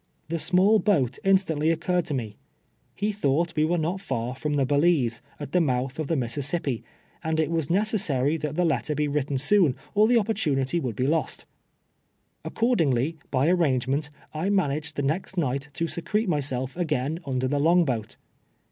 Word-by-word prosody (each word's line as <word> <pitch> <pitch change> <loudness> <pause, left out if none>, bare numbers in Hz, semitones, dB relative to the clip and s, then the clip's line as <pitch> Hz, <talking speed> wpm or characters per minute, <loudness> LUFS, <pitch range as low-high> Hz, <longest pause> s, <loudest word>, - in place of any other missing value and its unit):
The 165 0 -1
small 195 +6 +4
boat 140 - +1
instantly 180 -6 +2
occurred 175 +2 0
to 150 - -2
me. 110 -5 -4 0.6
He 205 +2 -1
tliought 170 -4 0
we 155 0 +3
were 175 +2 +1
not 170 +4 -2
far 125 -9 -3
from 150 +2 -2
the 140 -2 +2
Balize, 145 -5 +2 0.2
at 145 - -7
the 180 - +3
mouth 130 -1 -1
of 155 - -2
the 165 - 0
Mississip 140 +5 -1
pi, 125 -5 -2 0.4
and 160 -1 -1
it 160 0 +1
was 160 -4 -1
necessary 175 - +1
that 150 -1 -4
the 180 +1 +2
letter 150 -2 0
be 150 +1 0
written 145 -1 -1
soon, 150 0 +3 0.2
or 210 +1 +5
the 245 - +3
op])ortunity 170 - +1
would 125 -6 -3
be 130 - 0
lost. 160 +3 -1 1.0
Accordingly, 160 - +1
by 135 +2 +1
arrangement, 145 -4 +1 0.2
I 160 +5 -1
managed 155 -6 0
the 145 - -2
next 170 +6 -2
night 140 -2 -1
to 165 - -1
secret 210 +6 -2
myself 135 -5 -1
again 155 -3 -1
under 130 -1 0
the 145 +2 0
long 170 +3 +4
boat. 115 -6 -3
150 Hz, 175 wpm, -26 LUFS, 135-175 Hz, 1.0 s, or